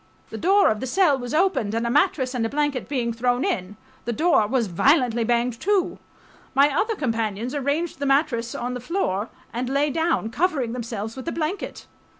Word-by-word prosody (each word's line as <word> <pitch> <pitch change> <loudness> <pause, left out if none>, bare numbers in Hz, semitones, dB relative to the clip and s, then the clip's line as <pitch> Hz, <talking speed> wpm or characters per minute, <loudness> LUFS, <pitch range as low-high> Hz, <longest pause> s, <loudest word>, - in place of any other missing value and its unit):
The - - -5
door 395 +3 +4
of 215 - -2
the 260 - -4
cell 340 +1 +3
was 245 -1 -5
opened 310 - +1
and 230 +1 0
a 235 - 0
mattress 280 -3 +2
and 245 -3 -1
a 225 - 0
blanket 290 -2 -1
being 240 -5 -1
thrown 245 +2 0
in, 185 +2 -2 0.3
the 240 - -1
door 310 -4 +3
was 245 0 +1
violently 240 - +2
banged 235 0 0
to.... 395 -2 +1 0.6
My 280 +1 +4
other... 445 +6 +1
companions 230 - -2
arranged 290 +3 -1
the 280 - -1
mattress 270 -5 +1
on 245 +1 -3
the 250 - -4
floor 235 - -2 0.2
and 245 +2 -2
lay 280 +2 +1
down, 320 -7 0
covering 285 -7 0
themselves 225 -3 -5
with 260 - -7
the 335 - -2
blanket. 330 +5 -4
255 Hz, 190 wpm, -24 LUFS, 230-305 Hz, 0.6 s, door